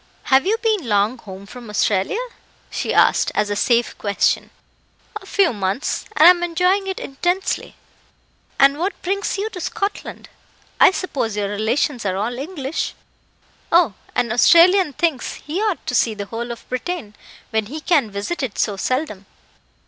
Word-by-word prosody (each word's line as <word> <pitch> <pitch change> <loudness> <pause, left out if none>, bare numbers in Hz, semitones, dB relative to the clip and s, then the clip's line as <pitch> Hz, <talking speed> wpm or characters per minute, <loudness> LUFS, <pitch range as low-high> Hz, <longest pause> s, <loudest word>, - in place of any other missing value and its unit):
"Have 270 +7 +5
you 440 +3 +2
been 420 - 0
long 210 +4 +1
home 195 -2 -10
from 240 +2 -11
Australia?" 205 - 0 0.5
she - - -2
asked, - - +3
as 210 -1 0
a - - 0
safe 235 +2 +1
question. 200 -3 0 0.7
"A - - -14
few 390 -8 +2
months, 200 +5 -2
and 315 - +8
am 355 -1 +7
enjoying 360 +3 +1
it 380 - -3
intensely." 355 +7 -2 0.8
"And 275 +2 +4
what 375 +4 -2
brings 395 +2 -1
you 405 +2 -2
to 360 - -7
Scotland? 400 +4 -4 0.5
I - - +8
suppose 275 - -3
your 200 -1 -1
relations 235 +5 -1
are 190 -2 -1
all 235 +5 -2
English?" 295 -1 -4 0.8
"Oh, 335 - +4 0.2
an 235 - 0
Australian 340 - +5
thinks 315 -3 -1
he 325 +7 -4
ought 425 -5 -1
to - - -3
see 225 -2 +2
the 205 -1 -5
whole 235 +4 -5
of 235 - -9
Britain, 255 -3 -4 0.4
when 220 -1 0
he 300 +7 -6
can 300 -8 +2
visit 205 +13 -4
it 255 -6 -4
so 205 -3 0
seldom. 210 -4 -2
265 Hz, 160 wpm, -20 LUFS, 210-355 Hz, 0.8 s, and